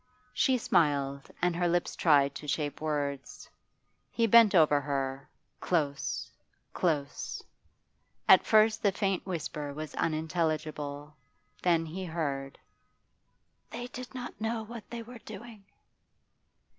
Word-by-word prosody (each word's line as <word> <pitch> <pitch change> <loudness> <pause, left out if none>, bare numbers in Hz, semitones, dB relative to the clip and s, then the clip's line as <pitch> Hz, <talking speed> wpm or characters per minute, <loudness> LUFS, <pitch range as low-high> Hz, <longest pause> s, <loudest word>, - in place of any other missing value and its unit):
She 260 -1 +3
smiled, 140 - +1
and 180 -1 +2
her 175 0 +1
lips 175 0 0
tried 140 -4 +4
to 150 +1 -8
shape 145 0 -2
words. 145 -3 -3 0.6
He 230 - +1
bent 230 -2 +7
over 150 -4 +5
her, 135 -1 -3 0.3
close, 145 -5 -1 0.4
close. 150 -5 -2 0.8
At - - +8
first 220 0 +4
the 200 - +3
faint 195 -1 -1
whisper 150 -4 -4
was 155 0 -6
unintelligible, 155 -2 -2 0.5
then 170 -2 +2
he 175 +4 -6
heard: 140 -5 -3 1.1
'They 240 +1 -6
did 255 +1 -8
not 245 -3 -7
know 225 0 -1
what 230 0 -10
they 235 -1 -6
were 240 +1 -11
doing. 225 -2 -10
160 Hz, 120 wpm, -30 LUFS, 145-215 Hz, 1.1 s, At